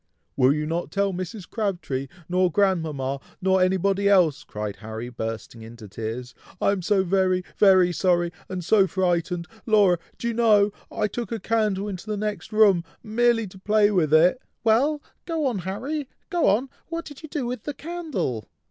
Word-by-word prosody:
"Will 130 0 +4
you 150 +1 0
not 165 +3 -2
tell 200 0 0
Mrs. 185 +2 -6
Crabtree, 175 - -2 0.2
nor 180 0 +2
grandmama, 155 -9 0 0.2
nor 190 0 +2
anybody 195 +2 +2
else?" 180 -8 +4
cried 105 -1 -5
Harry, 110 +2 -6
bursting 115 -1 -6
into 110 -1 -11
tears. 115 +5 -6 0.3
"I - - +3
am 200 -2 -1
so 195 +2 +2
very, 185 0 +1
very 185 -3 +5
sorry, 175 -1 +1 0.2
and 180 -2 -4
so 195 0 +4
frightened! 175 -2 0 0.2
Laura! 200 -6 +4 0.2
do 235 - -3
you - - -2
know, 215 -3 +4 0.2
I 215 - 0
took 240 +3 -5
a 230 - -2
candle 210 -3 0
into 195 0 -6
the 210 -1 -2
next 210 +1 -4
room, 205 -5 +5 0.2
merely 230 +1 +2
to 190 -1 -12
play 210 +1 +3
with 170 -7 +2
it." 170 +10 +5 0.2
"Well! 275 +7 +2 0.2
go 325 -3 -1
on, 240 -7 0
Harry! 250 - -4 0.2
go 350 -2 +2
on! 225 +7 +2 0.2
what 335 0 -4
did 290 -2 -11
you 315 - -9
do 285 -4 -3
with 245 -2 -5
the 295 - -4
candle?" 295 - -4
190 Hz, 175 wpm, -24 LUFS, 170-220 Hz, 0.3 s, very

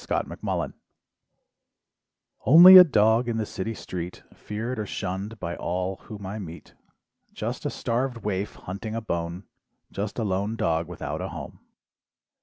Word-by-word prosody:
THE - - -1
STRAY - - -3 1.7
"Only 175 +9 +10
a 185 - +12
dog 115 -4 +3
in 115 - -1
the 110 - -1
city 110 +3 -5
street 90 -2 -7
"Feared 115 +3 -5
or 105 - -3
shunned 100 +5 -5
by 85 +1 -4
all 90 +2 -3
whom 100 0 -10
I 100 +3 -5
meet, 85 -4 -10 0.6
"Just - - -4
a - - -1
starved 120 0 -2
waif 100 0 -2
hunting 100 +4 -6
a 115 - -2
bone, 85 -2 -4 0.5
"Just 100 +1 -4
a 115 - -1
lone 100 +2 -1
dog 80 -5 0
without 90 -2 -5
a - - -4
home. - - -8
105 Hz, 150 wpm, -25 LUFS, 95-115 Hz, 1.7 s, a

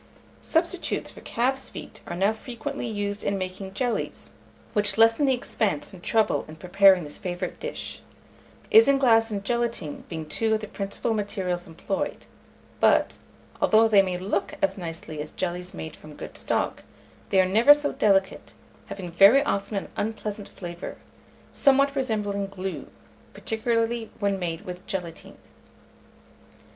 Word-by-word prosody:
Substitutes 340 +2 -1
for - - -13
calf's 265 +3 -1
feet - - -9
are 175 - -4
now 195 +4 +2
frequently 235 +1 -5
used 205 -2 -3
in 200 - 0
making 190 +1 -5
jellies, 245 +1 -2 0.4
which 205 0 +1
lessen 225 +6 +5
the 265 - +4
expense 205 -10 -2
and 185 - -11
trouble 220 +3 +2
in 155 - -10
preparing 185 +2 +5
this 145 -1 -6
favourite 180 0 -4
dish; 485 0 -5 0.7
isinglass 270 - +6
and 200 -2 -3
gelatine 235 -10 -2
being 160 -1 -5
two 220 +8 +1
of - - -1
the 215 - -6
principal 200 +2 -3
materials 190 -4 -2
employed; 165 +4 -4 0.5
but, - - +3 0.4
although 220 +1 +5
they 205 -3 +6
may 185 -2 -2
look 195 +2 -2
as 195 - +1
nicely 165 -4 -6
as 150 - -6
jellies 180 0 -4
made 160 -1 -7
from 155 -1 -13
good - - -9
stock, - - -1 0.5
they 195 - +3
are 185 - +5
never 220 +9 +6
so 290 0 +5
delicate, 195 -2 +1 0.3
having 180 -3 -6
very 200 +11 +7
often 200 +1 -1
an 195 - -4
unpleasant 210 -1 -4
flavour, 175 -1 -7 0.6
somewhat 275 0 +3
resembling 210 -6 -1
glue, 195 -1 -5 0.5
particularly 230 0 -1
when 200 -2 0
made 170 -2 -3
with 180 -3 -8
gelatine. 175 -4 -6
200 Hz, 145 wpm, -26 LUFS, 185-225 Hz, 0.7 s, very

